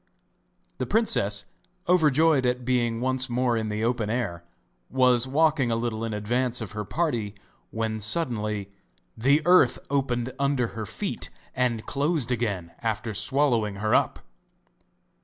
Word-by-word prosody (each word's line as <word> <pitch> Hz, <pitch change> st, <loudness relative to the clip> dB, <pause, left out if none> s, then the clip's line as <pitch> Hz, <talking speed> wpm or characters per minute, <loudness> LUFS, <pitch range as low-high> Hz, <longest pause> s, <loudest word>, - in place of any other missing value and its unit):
The -, -, -2 dB
princess, 105 Hz, -, +1 dB, 0.4 s
overjoyed 160 Hz, -4 st, +4 dB
at 125 Hz, 0 st, -1 dB
being 120 Hz, -2 st, 0 dB
once 130 Hz, +1 st, +1 dB
more 120 Hz, 0 st, +1 dB
in 110 Hz, -1 st, -2 dB
the 105 Hz, +1 st, -2 dB
open 115 Hz, -2 st, 0 dB
air, 105 Hz, -8 st, -2 dB, 0.5 s
was 125 Hz, -1 st, +3 dB
walking 150 Hz, -2 st, +2 dB
a 115 Hz, -, +1 dB
little 115 Hz, -1 st, -2 dB
in 115 Hz, -, -2 dB
advance 120 Hz, +4 st, -1 dB
of 110 Hz, -5 st, -6 dB
her 105 Hz, 0 st, -4 dB
party 115 Hz, -6 st, -2 dB, 0.3 s
when 110 Hz, -1 st, -2 dB
suddenly 105 Hz, -, -1 dB, 0.4 s
the 140 Hz, +7 st, +3 dB
earth 175 Hz, -8 st, +5 dB
opened 130 Hz, -3 st, -1 dB
under 140 Hz, -4 st, +1 dB
her 110 Hz, -2 st, -6 dB
feet -, -, -3 dB, 0.3 s
and 120 Hz, -3 st, 0 dB
closed 145 Hz, -3 st, -1 dB
again 100 Hz, -8 st, -2 dB
after 110 Hz, 0 st, -2 dB
swallowing 115 Hz, -2 st, +1 dB
her 110 Hz, +2 st, -1 dB
up! -, -, +2 dB
120 Hz, 140 wpm, -26 LUFS, 110-135 Hz, 0.5 s, earth